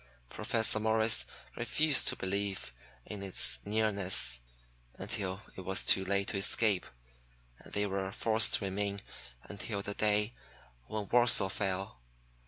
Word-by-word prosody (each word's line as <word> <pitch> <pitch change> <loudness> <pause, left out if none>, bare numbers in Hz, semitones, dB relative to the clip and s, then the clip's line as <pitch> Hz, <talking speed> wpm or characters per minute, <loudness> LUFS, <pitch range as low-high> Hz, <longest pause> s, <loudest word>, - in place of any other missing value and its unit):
Professor 110 -1 0
Morris 110 - +2 0.3
refused 150 -3 +2
to - - +3
believe 95 -8 -4 0.3
in 105 -2 -7
its 95 -2 +3
nearness 100 - +1 0.6
until 95 -1 -5 0.2
it - - -8
was 95 +1 -1
too 95 - +4
late 100 +1 -1
to - - -2
escape, 100 0 +3 0.7
and - - -16
they 105 0 0
were 95 -1 -3
forced 110 +2 +3
to 100 - -3
remain 100 +1 -3 0.4
until 100 0 -6
the 100 - -4
day 105 +2 0 0.5
when 105 -2 -5
Warsaw 120 -5 +4
fell. 95 -8 -4
100 Hz, 130 wpm, -31 LUFS, 95-110 Hz, 0.7 s, too